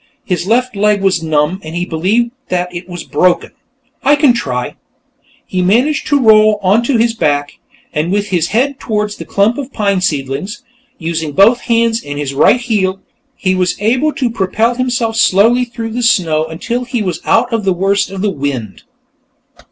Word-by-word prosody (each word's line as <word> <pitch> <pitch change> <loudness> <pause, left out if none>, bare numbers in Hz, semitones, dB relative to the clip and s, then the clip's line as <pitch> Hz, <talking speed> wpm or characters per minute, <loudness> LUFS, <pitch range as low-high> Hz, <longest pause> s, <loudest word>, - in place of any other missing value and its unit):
His 180 -4 -2
left 250 +2 +1
leg 205 0 +1
was 190 -3 +2
numb, 155 +3 0
and 160 +1 -7
he 175 +1 -1
believed 200 +9 0 0.2
that 180 0 -2
it 175 +1 -7
was 175 -1 -6
broken. 180 -1 +1 0.5
"I 285 +2 +5
can 285 -4 +4
try." 125 - -3 0.7
He 185 - -2
managed 245 +11 +1
to 285 - +2
roll 215 -3 +5
onto 230 +7 +2
his 230 0 +2
back, 145 -7 -1 0.4
with 195 +7 -1
his 175 -3 +1
head 260 +7 0
toward 210 -2 -2
the - - -8
clump 210 +6 +1
of 275 -1 -6
pine 200 -5 0
seedlings. 145 - -3 0.3
Using 160 -3 -3
both 220 - +5
hands 230 -1 +1
and 145 0 -6
his 145 -2 -3
right 150 - +4
heel, 200 -6 -1 0.4
he 185 -1 0
was 180 -1 0
able 250 +9 +1
to 250 -4 -1
propel 220 +3 0
himself 240 -2 -1
slowly 230 +5 +4
through 230 -2 -6
the 245 +2 -3
snow 165 -9 +2
until 235 +10 -4
he 240 -3 -3
was 175 -4 -3
out 240 +1 +1
of 225 -2 0
the 195 - +1
worst 195 +3 0
of 195 0 -5
the 210 - +1
wind. 135 - -4
200 Hz, 175 wpm, -14 LUFS, 175-235 Hz, 0.7 s, I